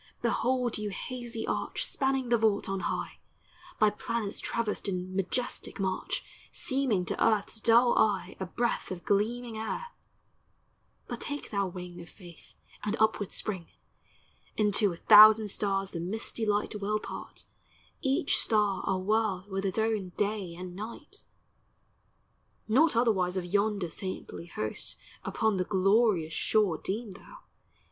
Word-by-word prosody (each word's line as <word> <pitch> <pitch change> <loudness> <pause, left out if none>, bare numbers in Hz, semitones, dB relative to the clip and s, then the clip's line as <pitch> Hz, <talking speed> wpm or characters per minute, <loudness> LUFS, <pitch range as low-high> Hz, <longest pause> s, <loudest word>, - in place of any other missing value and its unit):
behold 250 -3 +1
yon 210 -1 -2
hazy 240 +2 -5
arch - - -2
Spanning 265 -2 0
the 240 - +4
vault 215 -2 +2
on 195 0 -2
high, - - -3 0.6
By 215 -1 +4
planets 220 -1 -3
traversed 225 -2 -2
in 185 0 -4
majestic 195 +5 -2
march, 195 - -2 0.3
Seeming 260 -9 0
to - - -1
earth's 220 0 +1
dull 235 +2 +5
eye 195 -3 +1
A 190 - -3
breath 240 +5 -1
of 180 -2 -6
gleaming 225 +3 0
air: 220 - -3 1.2
but - - -6
take 290 0 -4
thou 200 -2 0
wing 180 -1 -8
Of 170 - -12
Faith 175 -5 -15 0.3
and 210 +2 -1
upward 215 -2 +2
spring: 185 -6 -2 0.5
— - - -34
Into 205 -1 +3
a - - -5
thousand 215 +3 +8
stars 195 -1 -1
the 170 - -4
misty 220 +5 -3
light 205 +1 +1
Will 210 +2 +1
part; - - -8 0.6
each 275 +5 +2
star 210 -4 +2
a 190 - +2
world 205 -1 0
with 195 +1 -2
its 190 - -3
own 220 -5 0
day 205 -4 -1
and 180 0 -8
night. 235 - -9 1.4
.Not 275 +6 +4
otherwise 195 -6 +2
of 180 - -2
yonder 200 -1 0
Saintly 185 -2 -6
host 110 -9 -3 0.3
Upon 220 -3 0
the 185 - +1
glorious 195 -3 +2
shore 200 -3 +1
Deem 210 +2 -4
thou. - - -13
210 Hz, 140 wpm, -29 LUFS, 190-225 Hz, 1.4 s, thousand